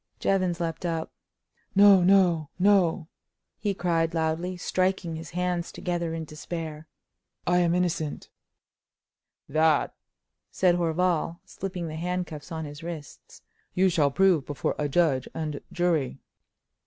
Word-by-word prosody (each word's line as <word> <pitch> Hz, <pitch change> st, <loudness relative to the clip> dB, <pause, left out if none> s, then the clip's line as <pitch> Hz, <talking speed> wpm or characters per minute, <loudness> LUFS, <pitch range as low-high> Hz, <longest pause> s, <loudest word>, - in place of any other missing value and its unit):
Jevons 185 Hz, -3 st, +1 dB
leaped 165 Hz, -1 st, -3 dB
up: 165 Hz, -2 st, -2 dB, 0.6 s
"No, 200 Hz, -1 st, +8 dB
no, 175 Hz, -5 st, +4 dB
no!" 185 Hz, -3 st, +3 dB, 0.5 s
he 205 Hz, -2 st, -1 dB
cried, 165 Hz, -2 st, 0 dB
loudly, 165 Hz, +3 st, -1 dB
striking 185 Hz, -2 st, 0 dB
his 160 Hz, 0 st, -7 dB
hands 180 Hz, 0 st, -2 dB
together 170 Hz, -2 st, -3 dB
in 160 Hz, -1 st, -4 dB
despair. 155 Hz, 0 st, -6 dB, 0.6 s
"I 180 Hz, 0 st, +3 dB
am 175 Hz, -1 st, +2 dB
innocent!" 170 Hz, -4 st, -2 dB, 1.2 s
"That," 155 Hz, 0 st, +2 dB, 0.6 s
said 180 Hz, -2 st, +3 dB
Horval, 170 Hz, 0 st, 0 dB
slipping 180 Hz, -3 st, -5 dB
the 155 Hz, 0 st, -6 dB
handcuffs 175 Hz, -2 st, -4 dB
on 160 Hz, -1 st, -4 dB
his 145 Hz, 0 st, -9 dB
wrists, 165 Hz, -4 st, -9 dB, 0.3 s
"you 190 Hz, +1 st, +4 dB
shall 155 Hz, -5 st, +3 dB
prove 175 Hz, -2 st, +3 dB
before 145 Hz, -, -1 dB
a 145 Hz, -1 st, 0 dB
judge 140 Hz, -4 st, +2 dB
and 155 Hz, -2 st, -3 dB
jury." 170 Hz, -6 st, 0 dB
170 Hz, 125 wpm, -27 LUFS, 160-180 Hz, 1.2 s, No